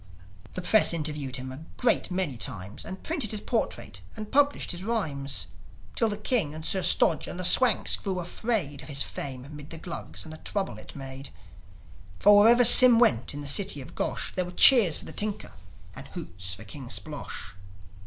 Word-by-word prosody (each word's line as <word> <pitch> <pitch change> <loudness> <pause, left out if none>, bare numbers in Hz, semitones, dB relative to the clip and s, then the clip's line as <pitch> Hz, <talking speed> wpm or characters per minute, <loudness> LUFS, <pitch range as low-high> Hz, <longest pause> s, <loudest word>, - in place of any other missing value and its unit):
The 185 - -5
Press 215 -1 +3
interviewed 150 -4 -3
him 130 0 -7
a 130 - -9 0.2
great 245 - +1
many 180 -7 -3
times, 110 -3 -6
And 190 - -9
printed 310 - -2
his 215 - -2
portrait, 230 +2 -4 0.2
and 215 -1 -8
published 285 +1 +1
his 175 0 -4
rhymes; 150 -12 -2 0.5
Till 225 - +1
the 205 - -2
King 210 - 0
and 155 0 -9
Sir 190 - 0
Stodge 170 -3 +2
and 175 - -6
the 185 - -2
Swanks 230 +4 +3
grew 190 -2 -4
afraid 175 - -3
Of - - -13
his 140 -2 0
fame 130 -1 -7
'mid 145 0 -12
the 165 - -7
Glugs 170 +1 -7
and 160 - -10
the - - -9
trouble 190 - -4
it - - -14
made. 135 0 -8 0.9
For, 205 +1 +5
wherever 240 +3 +5
Sym 250 0 +10
went 130 - +1
in 145 - -6
the 145 - -6
city 185 +1 +3
of 130 - -11
Gosh, - - -4
There 185 - -1
were - - -8
cheers 210 - +6
for - - -10
the - - -8
tinker, 210 0 -4 0.4
and - - -11
hoots 90 +1 -5
for 110 - -12
King 120 +4 -10
Splosh. 145 - -5
170 Hz, 195 wpm, -26 LUFS, 140-210 Hz, 0.9 s, Sym